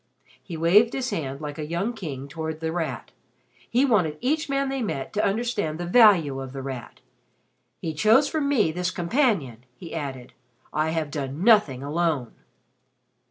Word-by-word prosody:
He 170 -4 -7
waved 200 +8 +4
his 260 -1 -2
hand 140 -2 -4
like 150 0 -6
a - - -2
young 180 +9 -1
king 140 - -6
toward 160 +1 -5
The 160 0 -2
Rat. 165 -2 -4 0.6
He 250 +4 +3
wanted 180 - +2
each 305 +4 0
man 275 0 0
they 270 -1 -2
met 140 - -3
to 210 - 0
understand 205 -7 -1
the 175 - -3
value 175 - +5
of 135 -1 -8
The 135 -1 -6
Rat. 130 -3 -7 0.8
"He 160 - -2
chose 220 - +4
for 315 - -1
me 280 - +2
this 180 +2 -1
companion," 175 - 0
he 170 +3 -10
added. 135 -6 -5 0.4
"I 155 +1 +1
have 160 -2 -2
done 145 +2 -4
nothing 200 - +4
alone." 150 -4 -1
165 Hz, 165 wpm, -25 LUFS, 145-220 Hz, 0.8 s, value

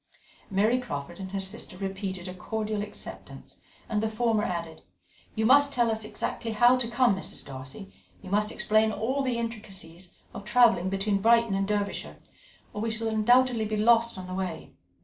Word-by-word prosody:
Mary 215 +5 +2
Crawford 170 - -6
and 190 -1 -6
her 195 +1 -3
sister 195 -1 -7
repeated 190 -1 -4
a 180 - -6
cordial 215 +3 -3
acceptance, 210 - -9 0.3
and 210 -2 0
the 220 - 0
former 225 -1 +1
added: 170 -5 -4 0.5
"You 220 - 0
must 285 +4 +6
tell 240 -3 +2
us 220 0 -3
exactly 225 +1 -4
how 240 +3 +6
to 250 -2 -1
come, 240 -3 +3
Mrs. 190 - -6
Darcy, 130 -8 -9 0.3
you 185 - -11
must 210 +1 +1
explain 215 +1 +2
all 255 +6 -1
the 255 -3 -1
intricacies 195 -6 -7 0.2
of - - -7
travelling 210 -5 +4
between 195 +1 0
Brighton 230 0 +4
and 195 0 0
Derbyshire, 205 -1 -2 0.6
or 210 - -4
we 225 - -1
shall 225 0 -1
undoubtedly 235 +1 +3
be 215 0 -2
lost 230 0 +3
on 185 - -6
the 185 - -7
road." 185 -3 -4
215 Hz, 175 wpm, -27 LUFS, 190-230 Hz, 0.6 s, must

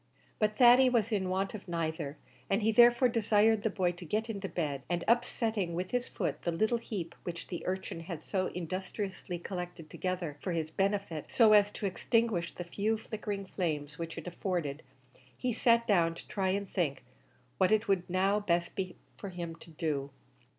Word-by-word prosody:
But 215 0 +1
Thady 250 +1 +8
was 230 -3 +1
in 190 -3 0
want 190 +1 -1
of 210 -3 -8
neither, 160 -3 -2 0.3
and 195 +2 +2
he 220 - +4
therefore 240 +3 +7
desired 220 -2 +3
the 220 - +1
boy 185 -3 +1
to 180 +1 -10
get 215 +7 -1
into 195 -2 -4
bed, 145 -5 -2
and 175 -1 0
upsetting 220 -6 +1
with 180 +2 -3
his 245 0 0
foot - - -3
the 170 - -1
little 220 +7 +1
heap 185 -7 -5
which 170 -1 -6
the 175 - -5
urchin 185 -2 -3
had 165 -2 -6
so 185 -2 0
industriously 185 +1 -4
collected 175 -3 -6
together 180 -5 -3
for 185 - -3
his 160 -1 -2
benefit, 195 -4 -1
so 225 -4 +6
as 205 -1 +6
to - - -4
extinguish 200 -2 +1
the 175 - -4
few 205 +5 0
flickering 210 -2 -5
flames 150 -6 -3
which 165 0 -5
it 165 - -6
afforded, 175 -5 -2 0.6
he 250 -2 -1
sat 235 +1 +4
down 170 -7 +3
to - - -10
try 190 -2 0
and 200 +1 0
think 165 -7 -1 0.6
what 190 +1 +4
it 215 +1 +3
would 190 -3 +1
now 190 +3 +2
be 205 - -11
best 170 0 +2 0.5
for 200 - -6
him 170 -2 -5
to 165 - -14
do. 150 -3 -2
190 Hz, 185 wpm, -31 LUFS, 170-215 Hz, 0.6 s, Thady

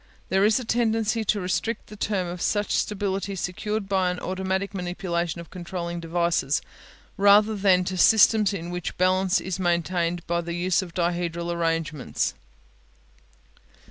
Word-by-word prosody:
There 190 +1 +3
is 215 +3 +4
a 250 - -6
tendency 225 -1 +1
to 210 - +1
restrict 200 +4 -2
the 210 - -11
term 185 -4 -2
to 175 - -10
such 205 -1 0
stability 195 -1 -1
secured 200 +3 -3
by 190 -2 +1
automatic 190 +2 -2
manipulation 175 -2 -3
of 170 - -10
controlling 175 -1 -5
devices, 165 -4 0 0.6
rather 205 +2 +5
than 190 -2 +3
to 185 +1 -3
systems 215 0 +5
in 175 -3 -5
which 180 -1 -4
balance 185 +1 +2
is 190 0 -4
maintained 175 -1 0
by 170 0 0
the 170 0 -5
use 180 +1 +1
of 175 -3 -9
dihedral 170 -1 -1
arrangements. 165 -4 -1
185 Hz, 140 wpm, -25 LUFS, 170-200 Hz, 0.6 s, rather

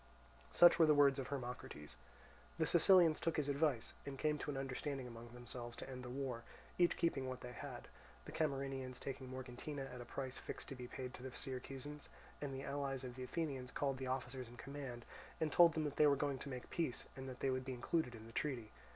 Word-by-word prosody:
Such 175 0 +8
were 165 - +8
the 150 - +7
words 140 -1 +6
of 130 - -2
Hermocrates. 120 - -5 0.6
The - - +3
Sicilians 170 -2 +7
took 165 -1 0
his 150 -2 +1
advice, 140 -4 +1
and 140 -1 -5
came 150 +1 +1
to - - -3
an 140 - -1
understanding 135 0 -2
among 120 -1 -8
themselves 120 0 -7
to - - -6
end 130 -1 -6
the 125 - -6
war, 130 -2 -2 0.4
each 175 -1 +5
keeping 140 -6 +1
what 130 0 -5
they 125 - -6
had—the 60 - -9
Camarinaeans 135 -4 -1
taking 130 -1 -5
Morgantina 130 +2 -5
at 125 - -6
a - - -7
price 130 +2 -4
fixed - - -6
to 135 - -5
be 125 -1 -6
paid 130 0 -5
to - - -9
the 130 - -4
Syracusans—and 135 +2 -6
the 135 0 -4
allies 140 -2 -1
of 125 -1 -5
the 130 - -7
Athenians 135 -3 -2
called 135 0 0
the 130 - -3
officers 130 -1 -2
in 120 +1 -12
command, 130 -2 -6 0.3
and 155 -2 +1
told 170 0 +8
them 160 - +1
that 145 -2 -2
they 150 - +7
were 140 - +6
going 140 -1 0
to - - -6
make 125 -2 -6
peace 160 -8 -1
and 130 0 -5
that 125 - -8
they 135 - +3
would 130 0 0
be 130 0 -3
included 125 +1 0
in 110 -1 -10
the 115 - -12
treaty. 120 -7 -1
135 Hz, 220 wpm, -40 LUFS, 125-145 Hz, 0.6 s, Such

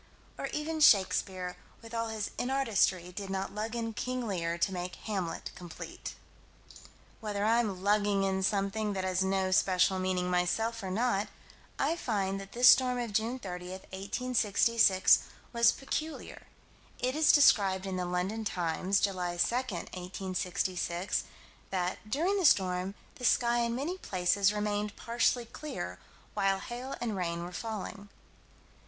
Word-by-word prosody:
Or - - -4
even 310 +1 -3
Shakespeare, 190 -7 +3 0.3
with 225 0 -11
all 230 0 -1
his 220 -2 -3
inartistry, 220 -9 +1
did 195 +1 -6
not 190 0 -3
lug 220 +3 -3
in 225 -1 -3
King 250 +2 -3
Lear 170 -4 -1
to 190 +3 0
make 180 0 -4
Hamlet 190 -6 -4
complete. 175 -2 -8 1.0
Whether 210 -2 -2
I'm 220 -5 +1
lugging 205 -1 +2
in 190 0 0
something 200 +2 0
that 190 -1 -2
has 185 0 +1
no 190 0 0
special 185 0 +3
meaning, 185 -1 0
myself, 220 +6 0
or 190 - -4
not, 205 0 +1 0.5
I 300 +4 +1
find 195 - -1
that 195 - -11
this 245 +1 +5
storm 250 0 +6
of 235 -3 -3
June 225 +4 0
30, 180 -5 -7
1866, 200 +1 +2 0.3
was 235 0 +5
peculiar. 310 +3 -5 0.5
It 255 +2 -1
is 310 0 +5
described 195 -10 +5
in 190 -1 -3
the 180 - -1
London 185 +5 -2
Times, 180 +1 0
July 180 -3 -1
2, 230 - +2
1866: 185 -4 -2 0.4
that 185 +3 -3
"during 355 - +1
the 370 - +1
storm, 185 -3 +2 0.2
the 250 - -11
sky 240 -1 +3
in 235 0 0
many 325 +9 -3
places 195 - +2
remained 210 0 -2
partially 235 +1 +1
clear 235 - -6 0.3
while 195 -1 +2
hail 245 +6 -6
and 225 -4 -2
rain 170 -2 -2
were 175 - -6
falling." 210 -1 -6
200 Hz, 145 wpm, -31 LUFS, 185-235 Hz, 1.0 s, storm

